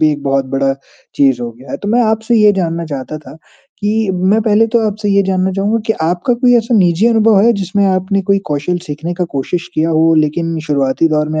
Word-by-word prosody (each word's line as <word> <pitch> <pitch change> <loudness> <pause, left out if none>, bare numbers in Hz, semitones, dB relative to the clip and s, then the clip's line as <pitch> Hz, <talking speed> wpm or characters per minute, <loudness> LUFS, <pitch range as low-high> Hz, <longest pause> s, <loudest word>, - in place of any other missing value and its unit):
भी 155 -1 +4
एक 145 - -6
बहुत 135 -1 0
बड़ा 135 0 +1 0.4
चीज़ 135 -3 +2
हो 120 - -4
गया 130 +3 -15
है। - - -3
तो 205 - -6
मैं 240 +3 +2
आपसे 220 +2 0
ये 210 -1 +5
जानना 170 -3 -2
चाहता 145 +1 -6
था 150 - -13 0.4
कि 210 0 0
मैं 190 +4 +1
पहले 215 +1 +3
तो 235 +1 +1
आपसे 210 0 -3
ये 200 0 +3
जानना 190 -1 0
चाहूँगा 210 +4 0
कि 220 - +2
आपका 175 +8 0
कोई 245 0 +3
ऐसा 235 +1 0
निजी 180 +4 +2
अनुभव 225 -2 +3
है 235 +3 +4
जिसमें 200 -1 -1
आपने 190 +1 0
कोई 200 +1 +1
कौशल 150 +5 -2
सीखने 155 +3 -5
का 180 0 -2
कोशिश 175 +6 -3
किया 160 +1 0
हो 160 +1 +3
लेकिन 160 +2 0
शुरुआती 140 +1 +1
दौर 150 -1 0
में 155 - -1
180 Hz, 225 wpm, -14 LUFS, 155-210 Hz, 0.4 s, ये